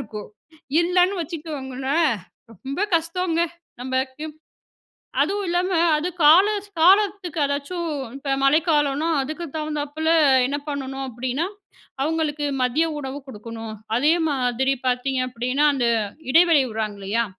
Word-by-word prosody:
இருக்கும். 210 -1 -7 0.5
இல்லன்னு 360 +2 +2
வச்சுக்கோங்களேன், 290 -2 -2 0.4
ரொம்ப 270 - -6 0.2
கஷ்டங்க 335 +1 -1 0.4
நமக்கு. 260 +3 -2 1.0
அதுவும் 405 0 -1
இல்லாமல 355 +1 +1 0.2
அது 330 - -2
காலஸ் 395 +7 +5
காலத்துக்கு 380 -2 +3
அதாச்சும், 290 +5 -2 0.3
இப்ப 275 0 -3
மழைக்காலன்னா 295 0 +2
அதுக்கு 310 +5 -5
தகுந்தாப்பில 305 0 -3 0.4
என்ன 280 +2 -2
பண்ணணும் 270 -1 -4
அப்டின்னா, 255 +6 -2 0.6
அவுங்களுக்கு 305 -1 -1 0.2
மதிய 265 +6 +2
உணவு 270 0 -5
குடுக்கணும். 225 -2 -8 0.2
அதே 295 +6 +4 0.2
மாதிரி 265 -1 +1
பாத்தீங்க 255 +1 0
அப்படின்னா, 250 +4 -1
அந்த 245 -3 0 0.4
இடைவெளி 330 -2 +5
விடுறாங்க 215 -2 -3
இல்லையா, 215 +4 0
290 Hz, 105 wpm, -23 LUFS, 260-330 Hz, 1.0 s, காலஸ்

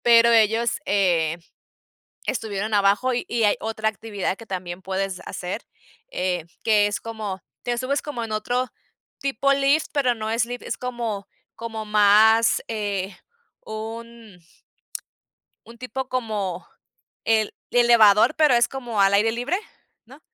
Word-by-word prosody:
Pero 235 0 +7
ellos, 225 +1 +3
eh, 170 -5 +2 0.9
estuvieron 215 -2 -2
abajo 205 +5 +3
y 245 - -2
y 235 -1 0
hay 210 - +4
otra 220 0 -1
actividad 205 -3 -4
que 230 - -12
también 185 -2 -5
puedes 190 0 -3
hacer, 180 +6 -5 0.5
eh, 180 -3 -1 0.2
que 210 -2 +4
es 205 - -3
como, 215 -4 -5 0.2
te 240 0 -1
subes 260 +3 -1
como 285 -6 -5
en 225 - -6
otro 245 +4 -1 0.5
tipo 275 0 +1
lift, 280 +3 +2
pero 270 -4 +2
no 220 -1 -4
es 225 +1 +1
lift, 245 0 -7
es - - -4
como 235 -5 -4 0.3
como 225 -1 -6
más, 215 +2 +5
eh, 200 -3 -3 0.5
un 225 -2 -8 1.3
un 235 +1 -13
tipo 255 +2 -5
como 215 -8 -3 0.6
el 220 -1 +1 0.2
elevador, 235 0 +5
pero 300 -5 +4
es 235 -1 +4
como 245 -5 -5
al 195 0 +4
aire 210 +3 +4
libre, 245 +10 -1 0.5
¿no? 270 +6 -16
220 Hz, 140 wpm, -23 LUFS, 205-240 Hz, 1.3 s, Pero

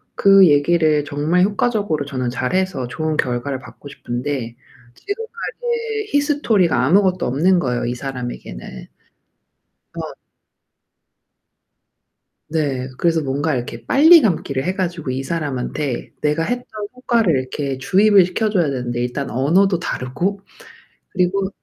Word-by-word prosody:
그 195 -1 +6
얘기를 150 0 +3
정말 155 +5 +1
효과적으로 205 -7 0
저는 130 -3 -3
잘해서 130 +2 -1
좋은 155 +3 -2
결과를 130 +1 -1
받고 130 +2 -13
싶은데 120 -2 -4 0.4
지금까지의 455 0 -4
히스토리가 235 - +2
아무것도 185 +3 +3
없는거예요, 140 -3 +1
이 120 - -2
사람에게는. 120 - -7 1.1
어. - - -5 2.4
네, 140 -5 -1
그래서 165 -2 +2
뭔가 145 +2 -1
이렇게 120 -1 -5
빨리 320 - +7
감기를 150 - -1
해가지고 175 -5 -2
이 130 +1 -2
사람한테 140 -3 -3
내가 150 +2 +1
했던 245 +4 -3 0.3
효과를 230 - +1
이렇게 135 +1 -4
주입을 195 +6 +4
시켜줘야 200 -1 0
되는데 125 -3 -3
일단 125 +3 -3
언어도 175 +9 +2
다르고 175 +6 -3 0.7
그리고 190 +1 0
155 Hz, 295 characters per minute, -20 LUFS, 130-195 Hz, 2.4 s, 빨리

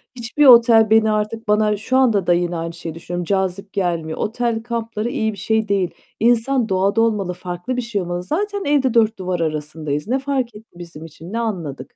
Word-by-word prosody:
Hiçbir 245 +5 0
otel 230 -3 +7
beni 220 0 +4
artık 215 +1 -2
bana 210 0 +2
şu 255 +5 0
anda 225 -8 +2
da 175 - +5
yine 175 0 0
aynı 165 0 -4
şeyi 165 -1 -7
düşünüyorum, 175 +1 -5
cazip 195 +1 -2
gelmiyor. 170 -4 -2
Otel 230 0 -2
kampları 230 -1 -3
iyi 220 -5 -1
bir - - -11
şey 220 +3 0
değil. 195 -3 0 0.3
İnsan 240 +1 +2
doğada 195 +3 +2
olmalı, 210 -5 0
farklı 180 +8 -5
bir - - 0
şey 230 -4 -3
olmalı. 175 0 -4
Zaten 405 - -2
evde 275 -4 +2
dört 225 -2 +3
duvar 185 -1 -2
arasındayız. 155 -1 -3
Ne 260 +4 0
fark 265 -4 -2
etti 220 +2 -14
bizim 165 -2 -10
için? 165 +4 -11
Ne 230 - -1
anladık? 175 -12 -5
210 Hz, 195 wpm, -20 LUFS, 175-235 Hz, 0.3 s, otel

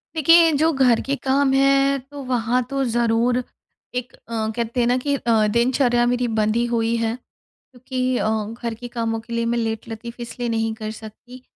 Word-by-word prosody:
देखिए, 330 +2 +6
जो 315 +2 +2
घर 255 -4 +3
के 280 - -2
काम 270 +1 +1
हैं 275 0 +3
तो 285 -1 -7
वहाँ 250 -1 0
तो 275 0 -1
ज़रूर 240 +1 +1 0.5
एक 250 +1 -3
अ, 225 -1 -4
कहते 235 +1 -2
हैं 240 - +3
ना 245 - +2
कि 285 +2 -1
अ, 225 -5 +2
दिनचर्या 240 +1 +2
मेरी 245 0 0
बंधी 215 +2 +1
ही 240 - +1
हुई 230 0 +1
है 230 0 -1 0.4
क्योंकि 255 0 -4
अ, - - 0
घर 220 +2 -3
के 245 +2 -8
कामों 230 -1 -2
के 235 +1 -10
लिए 230 0 0
मैं 235 +1 0
लेटलतीफ़ 225 +1 -4
इसलिए 235 0 -4
नहीं 225 -1 -1
कर 215 -1 -5
सकती 225 +4 -12
240 Hz, 185 wpm, -22 LUFS, 225-260 Hz, 0.5 s, देखिए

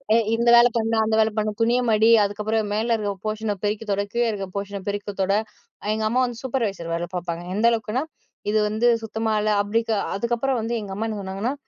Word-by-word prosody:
எ - - +6 0.2
இந்த 235 +1 +2
வேலை 240 +1 +7
பண்ணு, 225 0 +1
அந்த 220 0 +1
வேலை 220 0 +3
பண்ணு, 215 0 +1
துணிய 235 +2 +3
மடி, 220 +1 +4
அதுக்கப்புறம் 210 +1 -1
மேல 225 +3 +1
இருக்க 205 -2 -2
போர்ஷன 215 0 -1
பெருக்கி 210 +2 -1
தொட, 200 0 +1
கீழ 240 0 +2
இருக்க 200 -2 -4
போர்ஷன 200 0 -4
பெருக்கி 205 0 -3
தொட, 190 +1 +2 0.6
எங்க 220 0 -2
அம்மா 245 +3 +1
வந்து 240 -2 -6
சூப்பர்வைசர் 215 -10 -2
வேல 170 +1 -1
பாப்பாங்க. 170 -1 -3
எந்த 215 +3 +1
அளவுக்குன்னா, 230 +3 -1 0.5
இது 215 +1 +2
வந்து 220 +3 +1 0.2
சுத்தமா 220 0 -2
இல்ல. 215 - 0
அபிடிக்க 225 +2 -1 0.2
அதுக்கப்புறம் 240 +4 0
வந்து 230 +2 -2
எங்க 200 -2 -6
அம்மா 220 +3 -2
என்ன 215 -2 -4
சொன்னாங்கன்னா, 195 +6 -3
215 Hz, 200 wpm, -23 LUFS, 205-230 Hz, 0.6 s, வேலை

